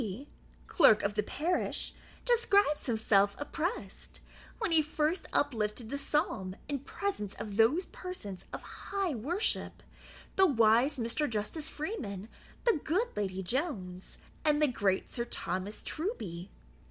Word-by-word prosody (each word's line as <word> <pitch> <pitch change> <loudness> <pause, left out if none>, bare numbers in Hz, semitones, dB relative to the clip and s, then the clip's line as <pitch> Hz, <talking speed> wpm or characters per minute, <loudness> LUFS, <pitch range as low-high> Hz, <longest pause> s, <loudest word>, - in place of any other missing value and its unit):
P., 225 +6 -5 0.4
clerk 220 - +6
of 200 - +1
the 210 - +1
parish, 315 - -1 0.3
describes 410 - +3
himself 205 -3 +3
oppressed, 325 +8 -4 0.4
when 440 -6 -1
he 325 -1 +6
first 310 +3 -1
uplifted 225 -4 0
the 280 - -1
psalm 255 - 0
in 285 -1 -1
presence 275 - -3
of 205 -2 -6
those 250 - +4
persons 220 - -7
of - - -6
high 390 -5 -3
worship, 320 - -1 0.5
the 385 0 +7
wise 240 +1 +4
Mr. 245 +5 0
Justice 225 +9 -1
Freeman, 230 - -4 0.3
the 465 -10 +3
good 405 +10 0
Lady 190 -2 -2
Jones, 190 - -2 0.3
and 300 -1 +3
the 300 - +5
great 200 -7 +1
Sir 235 - -3
Thomas 190 -3 -3
Truby. 200 - -4
265 Hz, 130 wpm, -32 LUFS, 210-330 Hz, 0.5 s, the